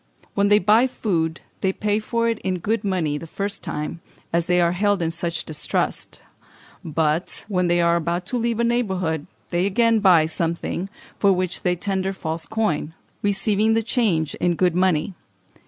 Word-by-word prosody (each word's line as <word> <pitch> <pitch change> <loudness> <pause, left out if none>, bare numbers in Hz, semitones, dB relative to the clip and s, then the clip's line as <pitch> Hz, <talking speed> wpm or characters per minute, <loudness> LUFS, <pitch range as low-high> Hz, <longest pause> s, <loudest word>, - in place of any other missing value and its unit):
When 200 0 +2
they 205 0 +6
buy 215 +6 +4
food 170 -9 -1 0.2
they 190 - +1
pay 210 +2 0
for 230 +1 -1
it 230 -1 0
in 185 -1 -2
good 210 +5 -1
money 170 -7 0
the 165 - -9
first 200 +4 -4
time, 150 +3 -4 0.3
as 170 0 +1
they 180 0 +3
are 170 -1 +3
held 205 +2 +1
in 165 -1 0
such 170 -1 -3
distrust; 155 - -2 0.6
but, 160 +1 0
when 180 -4 +1
they 175 0 +3
are 170 0 +3
about 170 +2 -2
to - - +2
leave 235 -1 -1
a - - +3
neighbourhood, 190 -10 0 0.2
they 175 +2 +1
again 230 +2 +3
buy 180 -6 +5
something, 170 +3 -2 0.3
for 200 - +5
which 185 -1 -1
they 180 -1 +1
tender 190 +1 -1
false 160 -3 -4
coin, 165 -8 -1 0.3
receiving 205 +2 +2
the 225 0 +2
change 195 - +1
in 175 -1 +2
good 180 0 +2
money. 180 0 +1
185 Hz, 175 wpm, -23 LUFS, 170-210 Hz, 0.6 s, they